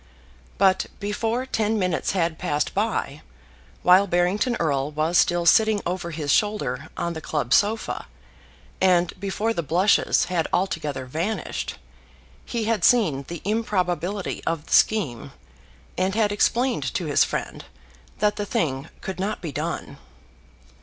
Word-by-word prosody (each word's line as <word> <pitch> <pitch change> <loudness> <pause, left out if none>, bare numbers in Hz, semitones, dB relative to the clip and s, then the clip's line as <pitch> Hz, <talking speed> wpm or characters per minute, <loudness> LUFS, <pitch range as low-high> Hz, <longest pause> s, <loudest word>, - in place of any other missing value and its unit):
But 190 -1 +3
before 225 +5 -1
ten 220 -3 0
minutes 180 -4 0
had 170 -4 0
passed 145 0 -1
by, 195 -8 -1 0.6
while 185 +3 +6
Barrington 185 +7 +1
Erle 140 -4 0
was 155 +3 -1
still 175 -1 +3
sitting 215 +4 +5
over 175 -1 -3
his 150 -3 -2
shoulder 160 - 0
on 170 - -2
the 160 - -6
club 145 -5 -1
sofa, 220 +2 +1 0.7
and 180 -2 +3
before 200 +4 -1
the 170 - -1
blushes 175 +7 +3
had 175 -3 -1
altogether 150 -8 -1
vanished, 170 +9 -3 0.7
he 235 -2 -2
had 225 0 0
seen 160 - +3
the 170 -2 -7
improbability 195 -3 -1
of 165 -2 -2
the - - -4
scheme, 150 - +2 0.7
and 190 +1 0
had 215 -2 +2
explained 240 +5 +1
to - - -1
his - - +4
friend - - -4 0.5
that 210 0 +1
the 205 - -2
thing 135 -6 -1
could 190 -1 -6
not 205 +3 -2
be 165 -4 -5
done. - - -4
185 Hz, 140 wpm, -24 LUFS, 160-210 Hz, 0.7 s, while